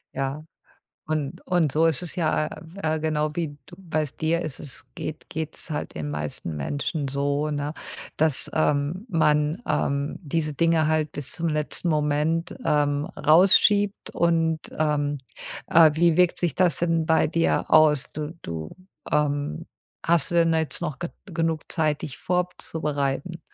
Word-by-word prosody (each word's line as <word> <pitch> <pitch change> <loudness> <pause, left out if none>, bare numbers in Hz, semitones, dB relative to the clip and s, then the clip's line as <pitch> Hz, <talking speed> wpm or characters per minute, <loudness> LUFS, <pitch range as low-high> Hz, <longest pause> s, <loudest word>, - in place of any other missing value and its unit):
Ja, 135 +3 -3 0.6
und, 155 -3 -2
und 165 -6 +2
so 160 +2 +3
ist 165 +1 +2
es 175 - -2
ja, 155 -3 +1
äh, - - -10
w - - -11
äh, 155 0 0
genau 155 -1 0
wie 155 -4 -3
du, 175 - -13
weißt 155 -6 -3
dir, 165 +2 +1
ist 150 -4 -4
es 130 -4 -2
geht 155 - -7
geht’s 155 0 -3
halt 150 - -4
den 75 -2 -4
meisten 75 +1 -3
Menschen 140 - -2
so, 140 +2 0
ne, 145 +1 -2 0.5
dass, 155 -3 +2
ähm, 155 - 0
man, 155 +2 +2
ähm, 140 +1 0
diese 155 -1 -2
Dinge 165 0 +2
halt 155 -1 0
bis 145 -2 -4
zum 170 -1 -1
letzten 150 +3 -1
Moment, 155 +2 0
ähm, 145 0 +1
rausschiebt. 195 +5 +4
Und, 165 -1 +1 0.2
ähm, 145 -2 0 0.5
äh, 160 -1 +7
wie 170 +1 +3
wirkt 180 -1 +4
sich 170 -6 0
das 180 -2 +2
denn 165 -2 +1
bei 160 - +3
dir 165 +1 0
aus? 155 -3 +5
Du 155 +2 -5
du, 80 -2 -6 0.3
ähm, 150 +2 0 0.4
hast 165 -2 +3
du - - -3
denn 165 -1 +4
jetzt 160 +1 -1
noch 150 -5 -3
ge 175 - -3 0.2
genug 165 -4 -1
Zeit, 155 -3 0
dich 135 - -6
vorzubereiten? 165 -3 -2
155 Hz, 160 wpm, -25 LUFS, 145-165 Hz, 0.6 s, äh